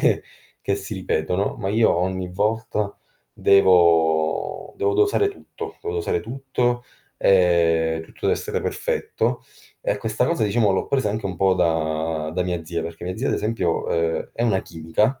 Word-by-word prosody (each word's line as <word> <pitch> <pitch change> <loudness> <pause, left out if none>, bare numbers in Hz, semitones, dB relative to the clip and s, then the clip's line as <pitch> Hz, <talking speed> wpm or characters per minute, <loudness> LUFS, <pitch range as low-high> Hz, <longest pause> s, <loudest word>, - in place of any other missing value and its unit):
che - - +2 0.4
che 100 - +2
si 100 +2 -6
ripetono, 90 +1 -1
ma 95 - -2
io 110 +3 +3
ogni 95 0 -1
volta 105 +1 -1 0.4
devo 85 -5 +3
devo 415 0 +1
dosare 410 0 +3
tutto, 400 - -9
devo 430 0 -3
dosare 435 0 0
tutto, 125 - -2 0.3
ehm, 85 -3 +3
tutto 80 - -17
deve - - +2
essere - - -2
perfetto. - - -1 0.4
E 100 - -1
questa 110 +3 0
cosa, 170 -3 0
diciamo, 105 0 +2
l'ho 95 - 0
presa 130 -6 +1
anche 105 -1 -3
un 95 -2 -5
po' 95 +1 +3
da 80 -2 0
da 90 - +1
mia 90 -2 -3
zia 85 +1 -3
perché 85 +1 -7
mia 90 +1 -4
zia, 135 +5 -1
ad - - +1
esempio, 105 -6 -1
uhm, 85 0 0
è 115 - -3
una 105 -5 +2
chimica 85 +11 -1
95 Hz, 165 wpm, -23 LUFS, 85-115 Hz, 0.4 s, io